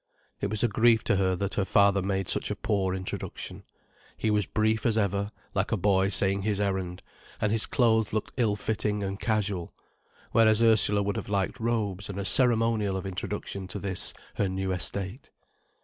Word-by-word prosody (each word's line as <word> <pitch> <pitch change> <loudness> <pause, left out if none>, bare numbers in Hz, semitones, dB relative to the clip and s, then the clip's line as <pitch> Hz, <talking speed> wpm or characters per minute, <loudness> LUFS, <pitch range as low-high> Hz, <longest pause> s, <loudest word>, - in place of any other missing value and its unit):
It 100 - -2
was 110 +2 -1
a - - +4
grief 115 +1 +3
to - - +1
her 95 -1 +1
that 100 +2 -3
her 100 - 0
father 100 0 +3
made 95 -1 -2
such - - +4
a 105 - -2
poor 100 -4 -1
introduction. 95 0 -6 0.6
He 110 - 0
was 105 -3 +1
brief 110 0 0
as 115 -2 +1
ever, 100 -1 0 0.2
like 95 +1 -1
a 115 - +1
boy 95 0 +2
saying 100 0 +2
his 100 0 -1
errand, 95 -3 -2 0.4
and 105 - 0
his 110 0 +3
clothes 110 -4 +2
looked 110 -1 -3
ill 110 -5 +2
fitting 105 -1 -2
and 95 +1 -4
casual. 100 -6 -2 0.6
Whereas 110 -1 +4
Ursula 105 -2 +4
would 100 0 -2
have - - -6
liked 100 -2 -1
robes 105 -4 -2
and 100 - -6
a 100 - -3
ceremonial 115 -5 +2
of 95 - -6
introduction 95 0 -5
to 90 - -5
this, 95 -2 +2 0.2
her 100 - +1
new 95 0 -2
estate. 95 - -2
100 Hz, 185 wpm, -27 LUFS, 95-110 Hz, 0.6 s, a